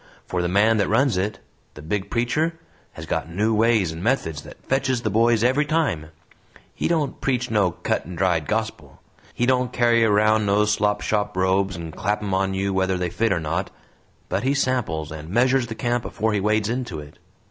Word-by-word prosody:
For 90 Hz, -, -2 dB
the 90 Hz, -, 0 dB
man 105 Hz, +5 st, +3 dB
that 105 Hz, -, +1 dB
runs 125 Hz, +1 st, +3 dB
it 100 Hz, +3 st, -1 dB, 0.4 s
the 75 Hz, -, -10 dB
big 95 Hz, +5 st, -3 dB
preacher 155 Hz, +8 st, 0 dB, 0.3 s
has -, -, -8 dB
got -, -, -2 dB
new 105 Hz, +6 st, 0 dB
ways 110 Hz, -5 st, +3 dB
and 80 Hz, +1 st, -7 dB
methods 90 Hz, -, 0 dB
that -, -, -12 dB
fetches 130 Hz, -2 st, 0 dB
the 110 Hz, -, -1 dB
boys 115 Hz, +1 st, +3 dB
every 130 Hz, +4 st, +3 dB
time. 145 Hz, -, 0 dB, 0.7 s
He -, -, -2 dB
don't 155 Hz, -5 st, -1 dB
preach 125 Hz, -2 st, -1 dB
no 105 Hz, -4 st, +3 dB
cut 85 Hz, -, -2 dB
and 90 Hz, -1 st, -8 dB
dried 85 Hz, -4 st, +1 dB
gospel; 105 Hz, -10 st, -3 dB, 0.4 s
he 120 Hz, -, +1 dB
don't 125 Hz, -1 st, +1 dB
carry 120 Hz, -2 st, +3 dB
around 110 Hz, 0 st, +3 dB
no 105 Hz, +1 st, +3 dB
slop 105 Hz, -1 st, +1 dB
shop 105 Hz, -2 st, -1 dB
robes 95 Hz, 0 st, +1 dB
and 85 Hz, -2 st, -7 dB
clap 105 Hz, +2 st, -1 dB
'em 100 Hz, -2 st, -2 dB
on 95 Hz, 0 st, 0 dB
you 100 Hz, 0 st, -1 dB
whether 95 Hz, 0 st, +1 dB
they 90 Hz, -1 st, -2 dB
fit 115 Hz, +3 st, 0 dB
or 90 Hz, -, +1 dB
not; 85 Hz, +5 st, -2 dB, 0.6 s
but 95 Hz, +2 st, -1 dB
he 135 Hz, +4 st, +1 dB
samples 105 Hz, -, -1 dB
and 80 Hz, 0 st, -8 dB
measures 125 Hz, +4 st, +2 dB
the 115 Hz, -, -6 dB
camp 120 Hz, +1 st, -1 dB
afore 110 Hz, +1 st, -1 dB
he 105 Hz, -, +1 dB
wades 105 Hz, +1 st, +1 dB
into 120 Hz, -6 st, -3 dB
it. 75 Hz, -1 st, -12 dB
105 Hz, 200 wpm, -23 LUFS, 95-120 Hz, 0.7 s, man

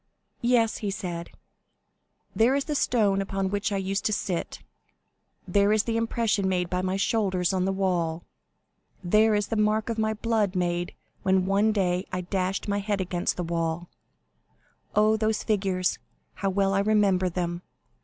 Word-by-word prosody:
"Yes," 235 Hz, -2 st, +2 dB
he 205 Hz, -, -3 dB
said, 175 Hz, -4 st, -5 dB, 1.1 s
"there 235 Hz, +4 st, +4 dB
is 280 Hz, -, 0 dB
the 300 Hz, -, -2 dB
stone 210 Hz, -8 st, +2 dB
upon 195 Hz, -1 st, -2 dB
which 205 Hz, +2 st, -1 dB
I 200 Hz, -, 0 dB
used 195 Hz, +1 st, -2 dB
to -, -, +2 dB
sit; 185 Hz, -4 st, -3 dB, 0.8 s
there 200 Hz, 0 st, +3 dB
is 215 Hz, 0 st, +3 dB
the 230 Hz, -, -2 dB
impression 225 Hz, -3 st, 0 dB
made 180 Hz, -2 st, -1 dB
by 180 Hz, 0 st, 0 dB
my 185 Hz, +1 st, -1 dB
shoulders 195 Hz, -3 st, +1 dB
on 185 Hz, -1 st, +1 dB
the 195 Hz, -, +1 dB
wall; 175 Hz, -4 st, -1 dB, 0.8 s
there 215 Hz, +4 st, +4 dB
is 205 Hz, 0 st, -1 dB
the 225 Hz, -, -1 dB
mark 215 Hz, +1 st, +1 dB
of 225 Hz, -1 st, -2 dB
my 220 Hz, 0 st, 0 dB
blood 215 Hz, -3 st, 0 dB
made 175 Hz, -1 st, -1 dB, 0.3 s
when 190 Hz, -1 st, +2 dB
one 200 Hz, +3 st, +3 dB
day 185 Hz, -2 st, 0 dB
I 185 Hz, -, -2 dB
dashed 185 Hz, +2 st, -2 dB
my 200 Hz, 0 st, 0 dB
head 205 Hz, 0 st, -1 dB
against 180 Hz, -1 st, -1 dB
the 180 Hz, -, -2 dB
wall. 165 Hz, 0 st, -2 dB, 1.1 s
Oh, 215 Hz, +1 st, +4 dB
those 215 Hz, 0 st, 0 dB
figures, 190 Hz, -3 st, 0 dB, 0.3 s
how 195 Hz, -, -2 dB
well 195 Hz, 0 st, +1 dB
I 195 Hz, -, +2 dB
remember 200 Hz, -3 st, +2 dB
them! 175 Hz, 0 st, -3 dB
195 Hz, 165 wpm, -26 LUFS, 180-215 Hz, 1.1 s, there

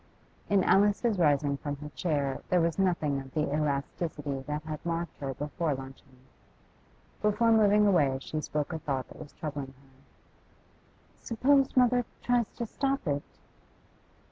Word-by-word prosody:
In 200 Hz, -2 st, +4 dB
Alice's 205 Hz, +1 st, +3 dB
rising 145 Hz, -3 st, +3 dB
from 145 Hz, 0 st, -4 dB
her 150 Hz, +1 st, -8 dB
chair 145 Hz, -1 st, -1 dB
there 180 Hz, -, +4 dB
was 165 Hz, +2 st, 0 dB
nothing 165 Hz, -7 st, +1 dB
of 135 Hz, -1 st, -13 dB
the 150 Hz, -2 st, 0 dB
elasticity 150 Hz, 0 st, -2 dB
that 150 Hz, +1 st, -3 dB
had 155 Hz, -1 st, -6 dB
marked 170 Hz, -1 st, -3 dB
her 135 Hz, -2 st, -4 dB
before 150 Hz, +2 st, -2 dB
luncheon. 135 Hz, 0 st, -11 dB, 1.0 s
Before 210 Hz, +2 st, +3 dB
moving 210 Hz, -1 st, +5 dB
away 150 Hz, -9 st, +3 dB
she 155 Hz, +3 st, -4 dB
spoke 150 Hz, +2 st, -3 dB
a 160 Hz, -, -3 dB
thought 135 Hz, -4 st, -3 dB
that -, -, -13 dB
was 145 Hz, -, -10 dB
troubling 145 Hz, -3 st, -5 dB
her. 135 Hz, 0 st, -19 dB, 1.3 s
'Suppose 265 Hz, +4 st, +2 dB
mother 250 Hz, 0 st, +5 dB, 0.2 s
tries 245 Hz, -3 st, +2 dB
to 235 Hz, -, -4 dB
stop 275 Hz, +3 st, -1 dB
it? 145 Hz, -2 st, -3 dB
155 Hz, 145 wpm, -29 LUFS, 140-205 Hz, 1.3 s, moving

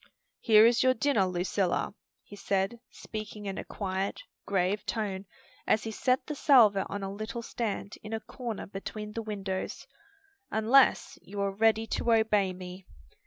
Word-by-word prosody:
"Here 220 Hz, -2 st, +6 dB
is 235 Hz, 0 st, +4 dB
your 255 Hz, 0 st, +4 dB
dinner, 225 Hz, -6 st, +2 dB
Lucilla," 180 Hz, +1 st, -1 dB, 0.3 s
he 205 Hz, -, -12 dB
said, 200 Hz, +3 st, -1 dB
speaking 215 Hz, -1 st, -7 dB
in 195 Hz, -1 st, -4 dB
a -, -, -4 dB
quiet, 190 Hz, -1 st, -3 dB, 0.3 s
grave 195 Hz, +1 st, +1 dB
tone, 200 Hz, -4 st, -3 dB, 0.4 s
as 215 Hz, -, +3 dB
he 225 Hz, -, -4 dB
set 255 Hz, +4 st, +1 dB
the 300 Hz, -, -4 dB
salver 235 Hz, -9 st, +5 dB
on 200 Hz, 0 st, -4 dB
a 195 Hz, 0 st, -4 dB
little 215 Hz, +3 st, -5 dB
stand 215 Hz, -3 st, -4 dB
in 210 Hz, -, -9 dB
a 225 Hz, -, -1 dB
corner 235 Hz, -1 st, -6 dB
between 210 Hz, +2 st, -7 dB
the 230 Hz, -, -3 dB
windows; 195 Hz, -3 st, -4 dB, 0.6 s
"unless 235 Hz, +5 st, +3 dB
you 200 Hz, +2 st, -8 dB
are 200 Hz, 0 st, 0 dB
ready 220 Hz, +2 st, +2 dB
to 235 Hz, -, -1 dB
obey 210 Hz, -4 st, +3 dB
me. 180 Hz, 0 st, -9 dB
210 Hz, 160 wpm, -29 LUFS, 195-225 Hz, 0.6 s, Here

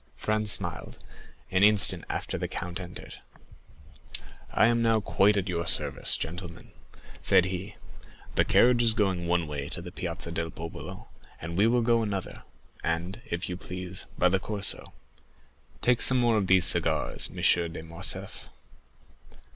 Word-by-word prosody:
Franz 110 Hz, -1 st, 0 dB
smiled; -, -, -2 dB, 0.5 s
an 95 Hz, -, +2 dB
instant 100 Hz, -4 st, +4 dB
after -, -, -3 dB
the -, -, -2 dB
count 90 Hz, +1 st, -5 dB
entered. 90 Hz, -2 st, -9 dB, 1.3 s
"I -, -, +4 dB
am 115 Hz, +1 st, +3 dB
now 115 Hz, -1 st, +3 dB
quite 105 Hz, 0 st, +3 dB
at 100 Hz, -1 st, -1 dB
your 85 Hz, -2 st, -2 dB
service, -, -, 0 dB
gentlemen," 85 Hz, +1 st, -7 dB, 0.5 s
said 90 Hz, -, +5 dB
he. 95 Hz, +1 st, -4 dB, 0.6 s
"The -, -, +3 dB
carriage 120 Hz, 0 st, +4 dB
is 115 Hz, -2 st, +3 dB
going 95 Hz, -5 st, 0 dB
one 85 Hz, -1 st, +1 dB
way 70 Hz, -1 st, -4 dB
to -, -, -4 dB
the 90 Hz, 0 st, -8 dB
Piazza 85 Hz, -1 st, -5 dB
del 80 Hz, 0 st, -2 dB
Popolo, 80 Hz, 0 st, -8 dB, 0.3 s
and 85 Hz, +1 st, -6 dB
we 100 Hz, +4 st, +4 dB
will 120 Hz, 0 st, +2 dB
go 115 Hz, 0 st, +3 dB
another; 100 Hz, -4 st, -4 dB, 0.4 s
and, 85 Hz, +6 st, -2 dB
if 85 Hz, +1 st, -2 dB
you 90 Hz, -, -4 dB
please, 90 Hz, 0 st, -4 dB
by 90 Hz, -, +4 dB
the 95 Hz, +1 st, +2 dB
Corso. 100 Hz, 0 st, -2 dB, 0.9 s
Take 125 Hz, -1 st, +3 dB
some 130 Hz, -, +5 dB
more 120 Hz, -2 st, +3 dB
of 100 Hz, -3 st, +1 dB
these 95 Hz, -2 st, +5 dB
cigars, -, -, +2 dB
M. -, -, -14 dB, 0.4 s
de 80 Hz, -1 st, -7 dB
Morcerf." 85 Hz, +1 st, -5 dB
95 Hz, 155 wpm, -28 LUFS, 85-110 Hz, 1.3 s, said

